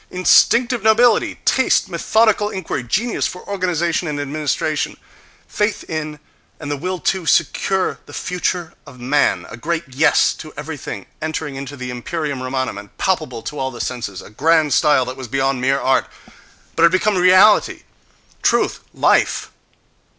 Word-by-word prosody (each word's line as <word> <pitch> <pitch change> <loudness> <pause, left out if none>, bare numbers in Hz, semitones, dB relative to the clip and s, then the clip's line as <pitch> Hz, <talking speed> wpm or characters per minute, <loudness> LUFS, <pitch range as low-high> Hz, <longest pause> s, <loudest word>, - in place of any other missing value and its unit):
Instinctive 235 +6 +3
nobility, 220 +1 +3
taste, 260 - +3
methodical 210 +4 +2
inquiry, 190 -8 -4
genius 215 - -1
for 180 - -10
organization 180 -3 -1
and 150 -1 -3
administration, 150 +1 -2 0.5
faith 210 0 -1
in 155 -1 -4 0.4
and 145 -2 -6
the - - 0
will 185 +6 -3
to 180 -1 -1
secure 185 +5 +1
the - - -12
future 180 -1 -3
of 125 - -13
man, 130 +4 +1
a - - -8
great 165 +6 -2
yes 140 +5 +3
to 155 - -9
everything 145 -10 -6 0.2
entering 155 -2 -4
into 140 +1 -7
the 125 -1 -5
imperium 140 +2 -4
Romanum 130 -4 -3
and 105 - -15
palpable 155 -11 -1
to 145 +5 -6
all 130 - -1
the 120 -2 -10
senses, 115 -7 -4
a - - -14
grand 155 +4 +2
style 145 -4 +3
that 130 +1 -6
was 130 -2 -7
beyond 135 +1 0
mere 135 +2 +2
art, 130 0 +1 0.7
but - - -1
had 170 - +6
become 200 +3 +2
reality, 185 +3 +5 0.6
truth, - - +1 0.2
life.... - - +2
155 Hz, 150 wpm, -19 LUFS, 135-185 Hz, 0.7 s, had